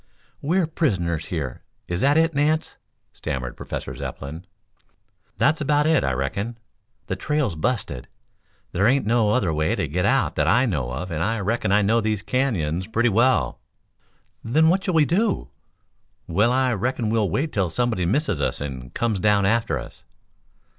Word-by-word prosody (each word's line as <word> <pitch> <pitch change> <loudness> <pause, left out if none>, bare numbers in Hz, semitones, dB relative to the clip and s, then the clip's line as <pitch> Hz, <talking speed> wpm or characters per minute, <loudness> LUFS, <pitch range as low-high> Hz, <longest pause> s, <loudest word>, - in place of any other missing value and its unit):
"We 165 +6 +1
are 185 - +3
prisoners 90 - -1
here? 70 -8 -4 0.3
Is 90 +2 -2
that 145 +3 +4
it, 165 0 +3
Nance?" 150 +2 0 0.4
stammered 60 -2 -4
Professor - - -6
Zepplin. 80 +6 -7 0.9
"That's 155 +2 +2
about 150 0 +2
it, 160 0 +3
I 65 - +1
reckon. 100 - -3 0.5
The 95 - -3
trail's 150 - -1
busted. 95 - -2 0.6
There 100 +4 +2
ain't 135 -1 +2
no 115 -1 +2
other 105 -7 +1
way 80 +1 +1
to - - -1
get 90 +6 -1
out - - +2
that - - +2
I 125 - +4
know 75 - -2
of 85 +8 -5
and 80 -1 -2
I 115 +4 0
reckon 105 0 -1
I 105 +1 +4
know 115 +3 +3
these 110 -2 -1
canyons 95 - -1
pretty 115 +2 +2
well." 115 - +2 0.8
"Then 155 +8 +3
what 190 +2 +2
shall 185 - -1
we 155 -2 +5
do?" 200 +6 0 0.7
"Well, 105 +8 +2
I 130 -1 +2
reckon 115 +1 -1
we'll 110 -4 +1
wait 150 - -1
till 95 -4 +1
somebody 100 0 0
misses 105 - 0
us - - -1
and 65 -3 -6
comes 115 -4 0
down 105 0 +3
after 115 +3 +1
us." - - -10
110 Hz, 170 wpm, -23 LUFS, 85-135 Hz, 0.9 s, we